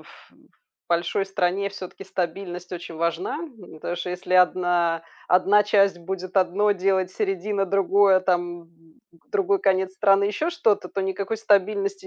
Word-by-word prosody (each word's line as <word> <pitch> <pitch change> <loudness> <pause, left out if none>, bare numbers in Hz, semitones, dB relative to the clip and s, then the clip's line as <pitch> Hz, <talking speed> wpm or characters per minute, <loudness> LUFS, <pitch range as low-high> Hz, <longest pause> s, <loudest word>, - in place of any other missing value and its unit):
ф - - -18
э, - - -26 0.5
в - - -74
большой 175 +3 0
стране 195 +1 0
всё-таки 195 0 -9
стабильность 180 0 -5
очень 170 -2 -7
важна, 170 - -2
м, 240 - -11
потому 175 +3 -5
что 180 +1 -4
если 180 +1 -3
1, 175 -2 +2 0.3
1 195 +3 +4
часть 195 -3 +2
будет 185 +2 -6
одно 195 +3 +3
делать, 190 -1 0
середина- 195 0 -1
другое, 195 0 +3
там, 175 -2 -1
м, 165 - -24 0.6
другой 395 -1 +1
конец 190 -1 +1
страны- 195 0 +3
еще 305 +11 -1
что-то, 220 - +1
то 195 - -4
никакой 195 +3 -3
стабильности 225 - +1
190 Hz, 155 wpm, -24 LUFS, 180-205 Hz, 0.6 s, 1